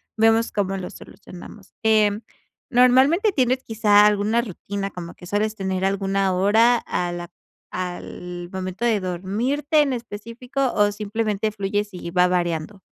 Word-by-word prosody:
vemos 225 Hz, +1 st, +3 dB
cómo 195 Hz, -1 st, -1 dB
lo 180 Hz, -, -5 dB
solucionamos, 185 Hz, +2 st, -13 dB
eh, 215 Hz, -2 st, +3 dB, 0.5 s
¿normalmente 265 Hz, -, +4 dB
tienes 255 Hz, -1 st, +1 dB
quizá 210 Hz, -2 st, +4 dB
alguna 210 Hz, +3 st, +2 dB
rutina, 200 Hz, -2 st, -5 dB
como 170 Hz, -1 st, -8 dB
que 180 Hz, -, -13 dB
sueles 210 Hz, +3 st, -1 dB
tener 190 Hz, -2 st, -2 dB
alguna 195 Hz, 0 st, +1 dB
hora 220 Hz, +6 st, +4 dB
a 175 Hz, -1 st, -2 dB
la 175 Hz, 0 st, -6 dB, 0.4 s
al 180 Hz, -1 st, -6 dB
momento 185 Hz, +4 st, -4 dB
de 225 Hz, -3 st, +2 dB
dormirte 235 Hz, -, 0 dB
en 275 Hz, -3 st, +1 dB
específico 240 Hz, +3 st, -4 dB
o 205 Hz, 0 st, +3 dB
simplemente 215 Hz, 0 st, -2 dB
fluyes 205 Hz, 0 st, -2 dB
y 170 Hz, -1 st, -7 dB
va 180 Hz, 0 st, +4 dB
variando? 175 Hz, +2 st, -2 dB
205 Hz, 140 wpm, -22 LUFS, 185-230 Hz, 0.5 s, normalmente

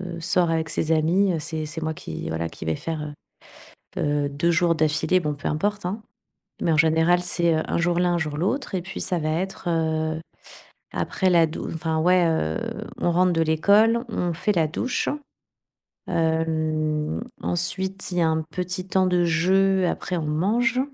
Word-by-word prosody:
heu, -, -, -7 dB
sort 175 Hz, 0 st, +2 dB
avec 160 Hz, 0 st, -1 dB
ses 160 Hz, +1 st, -1 dB
amis, 175 Hz, +5 st, +3 dB
heu, 165 Hz, -, 0 dB
c'est 155 Hz, 0 st, -4 dB
c'est 160 Hz, +2 st, -6 dB
moi 160 Hz, 0 st, -1 dB
qui 80 Hz, -, -7 dB
voilà, 80 Hz, +1 st, -2 dB
qui 80 Hz, -, -9 dB
vais 80 Hz, 0 st, 0 dB
faire, 150 Hz, -2 st, -5 dB, 0.8 s
heu -, -, -1 dB
heu, 145 Hz, -1 st, +1 dB
2 145 Hz, +5 st, 0 dB
jours 170 Hz, 0 st, +3 dB
d'affilée, 155 Hz, +3 st, +2 dB
bon 150 Hz, -3 st, -1 dB
peu 145 Hz, -, -4 dB
importe, 200 Hz, +5 st, -1 dB
hein, 210 Hz, +4 st, -4 dB, 0.6 s
mais 165 Hz, -, +1 dB
en -, -, +3 dB
général, 160 Hz, +2 st, +4 dB
c'est 175 Hz, -1 st, +1 dB
un 160 Hz, +1 st, -1 dB
jour 175 Hz, 0 st, +1 dB
l'un, 175 Hz, -1 st, +2 dB
un -, -, +1 dB
jour 150 Hz, -3 st, -3 dB
l'autre 200 Hz, -, -1 dB
et 180 Hz, -, -1 dB
puis 190 Hz, +2 st, -7 dB
ça 180 Hz, -, -1 dB
va 155 Hz, -, -1 dB
être, 180 Hz, +3 st, -3 dB
heu, 160 Hz, -1 st, 0 dB, 0.7 s
après 190 Hz, -, 0 dB
la 170 Hz, -2 st, +5 dB
dou 155 Hz, -, -6 dB
enfin 160 Hz, -1 st, -1 dB
ouais, 180 Hz, +1 st, +4 dB
heu, 80 Hz, -, 0 dB, 0.4 s
on 175 Hz, -, +1 dB
rentre 180 Hz, +1 st, +3 dB
de 165 Hz, -, +1 dB
l'école, 205 Hz, +9 st, +4 dB
on 175 Hz, -6 st, -1 dB
fait 210 Hz, +6 st, 0 dB
la 165 Hz, -2 st, +3 dB
douche. 245 Hz, +11 st, -1 dB, 1.0 s
Hem, 160 Hz, -2 st, 0 dB, 0.2 s
ensuite, 190 Hz, +2 st, -1 dB
il 180 Hz, -, -3 dB
y -, -, +3 dB
a 165 Hz, -, +4 dB
un 160 Hz, 0 st, +1 dB
petit 180 Hz, +2 st, -3 dB
temps 190 Hz, 0 st, +2 dB
de 180 Hz, -1 st, +2 dB
jeu. 185 Hz, +3 st, +3 dB
Après, 180 Hz, +1 st, -2 dB
on 165 Hz, -, -2 dB
mange. 220 Hz, +11 st, +1 dB
165 Hz, 190 wpm, -24 LUFS, 155-180 Hz, 1.0 s, la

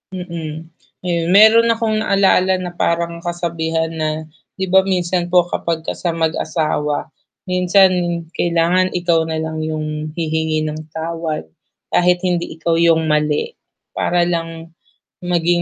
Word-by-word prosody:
Mm, 170 Hz, -4 st, -5 dB, 0.5 s
ayun. 170 Hz, -2 st, 0 dB
Mayro'n 220 Hz, +3 st, +7 dB
akong 225 Hz, -1 st, -1 dB
naalala 195 Hz, -3 st, +3 dB
na 180 Hz, -1 st, -5 dB
parang 170 Hz, 0 st, 0 dB
kasabihan 165 Hz, -1 st, -2 dB
na, 155 Hz, -, +1 dB, 0.5 s
'di 190 Hz, -, -2 dB
ba 190 Hz, -, +7 dB
minsan 180 Hz, -1 st, 0 dB
po 180 Hz, -, +6 dB
kapagka 165 Hz, -1 st, -2 dB
sa 175 Hz, -, +1 dB
mag-asawa, 155 Hz, -2 st, 0 dB, 0.5 s
minsan 185 Hz, +1 st, +4 dB, 0.5 s
kailangan 175 Hz, +2 st, +2 dB
ikaw 170 Hz, -2 st, +2 dB
na 160 Hz, -, -2 dB
lang 160 Hz, 0 st, -4 dB
'yong 155 Hz, -1 st, -3 dB, 0.3 s
hihingi 160 Hz, -1 st, -1 dB
ng 155 Hz, 0 st, -4 dB, 0.2 s
tawad 165 Hz, -1 st, -3 dB, 0.5 s
kahit 180 Hz, 0 st, +3 dB
hindi 175 Hz, -1 st, 0 dB
ikaw 165 Hz, 0 st, 0 dB
'yong 165 Hz, -1 st, +4 dB
mali 150 Hz, -, +1 dB, 0.5 s
para 175 Hz, 0 st, +2 dB
lang 170 Hz, -1 st, -1 dB, 0.7 s
maging 175 Hz, 0 st, +1 dB
170 Hz, 125 wpm, -18 LUFS, 160-180 Hz, 0.7 s, Mayro'n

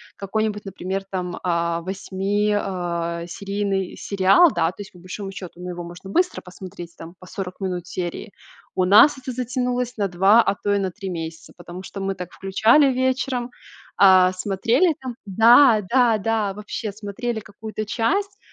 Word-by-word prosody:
какой-нибудь, 210 Hz, +1 st, -2 dB
например, 195 Hz, 0 st, -4 dB
там, 180 Hz, -2 st, -4 dB
а, 170 Hz, -1 st, 0 dB
8-ми, 195 Hz, +3 st, -1 dB
а, 170 Hz, -4 st, -2 dB
серийный 195 Hz, +1 st, -3 dB
сериал, 200 Hz, -, +4 dB
да, 165 Hz, -1 st, +2 dB
то 185 Hz, -, -9 dB
есть, 200 Hz, -, -10 dB
по 180 Hz, -, -16 dB
большому 195 Hz, +2 st, -7 dB
счету, 180 Hz, -2 st, -9 dB
ну 180 Hz, 0 st, -6 dB
его 175 Hz, -1 st, -6 dB
можно 175 Hz, +3 st, -10 dB
быстро 360 Hz, -, +1 dB
посмотреть, 180 Hz, -2 st, -10 dB
там, 165 Hz, +2 st, -11 dB
по 185 Hz, -, -13 dB
40 185 Hz, 0 st, -7 dB
минут 180 Hz, -3 st, -4 dB
серии. 180 Hz, +3 st, -5 dB, 0.4 s
У 185 Hz, -1 st, +2 dB
нас 215 Hz, +9 st, +7 dB
это 260 Hz, 0 st, -6 dB
затянулось 250 Hz, 0 st, -2 dB
на 200 Hz, -2 st, +1 dB
два, 195 Hz, +5 st, +5 dB
а -, -, +1 dB
то 205 Hz, -, -2 dB
и -, -, +2 dB
на 190 Hz, -2 st, -1 dB
три 195 Hz, 0 st, -7 dB
месяца, 165 Hz, -2 st, -6 dB
потому 175 Hz, +1 st, -9 dB
что 195 Hz, +1 st, -8 dB
мы 195 Hz, 0 st, -1 dB
так 180 Hz, -2 st, -8 dB
включали 230 Hz, +8 st, +3 dB
вечером, 255 Hz, -1 st, -1 dB, 0.5 s
а, 185 Hz, -2 st, +6 dB
смотрели 215 Hz, -, +1 dB
там 255 Hz, -2 st, -6 dB
Да, 225 Hz, +3 st, +6 dB
да, 245 Hz, -3 st, +4 dB
да. 215 Hz, -1 st, 0 dB
Вообще 210 Hz, +1 st, -5 dB
смотрели 220 Hz, +3 st, -4 dB
какую-то 215 Hz, +1 st, -7 dB
часть, 395 Hz, -, -1 dB
195 Hz, 170 wpm, -22 LUFS, 180-225 Hz, 0.5 s, нас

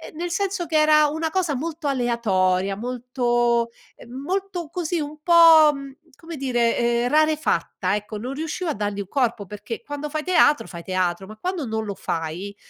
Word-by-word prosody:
nel 345 Hz, +2 st, -4 dB
senso 390 Hz, -2 st, -1 dB
che 315 Hz, -1 st, +1 dB
era 305 Hz, 0 st, +5 dB
una 320 Hz, +2 st, -2 dB
cosa 340 Hz, -3 st, 0 dB
molto 315 Hz, +3 st, -5 dB
aleatoria, 200 Hz, -7 st, +1 dB
molto, 240 Hz, 0 st, 0 dB, 0.3 s
ehm, 235 Hz, -, -14 dB
molto 365 Hz, +2 st, -3 dB
così, 345 Hz, 0 st, -2 dB
un 300 Hz, 0 st, -5 dB
po', 330 Hz, -3 st, +8 dB
mhmm, 275 Hz, 0 st, -8 dB, 0.3 s
come 330 Hz, -2 st, -9 dB
dire, 240 Hz, -3 st, +1 dB
ehm, 235 Hz, 0 st, +1 dB
rarefatta, 300 Hz, -, +1 dB
ecco. 210 Hz, +1 st, -5 dB
Non 250 Hz, +5 st, -5 dB
riuscivo 320 Hz, +4 st, -4 dB
a -, -, -2 dB
dargli 205 Hz, -1 st, -3 dB
un 195 Hz, -, -8 dB
corpo, 235 Hz, -6 st, 0 dB
perché 210 Hz, +4 st, -7 dB
quando 290 Hz, +2 st, -5 dB
fai 305 Hz, 0 st, -3 dB
teatro 350 Hz, -5 st, +3 dB
fai 170 Hz, -2 st, -8 dB
teatro, 185 Hz, 0 st, -1 dB
ma 215 Hz, +1 st, -11 dB
quando 360 Hz, -, -3 dB
non 220 Hz, 0 st, -2 dB
lo 200 Hz, -, -4 dB
fai, 170 Hz, +5 st, -4 dB
260 Hz, 175 wpm, -23 LUFS, 215-315 Hz, 0.3 s, po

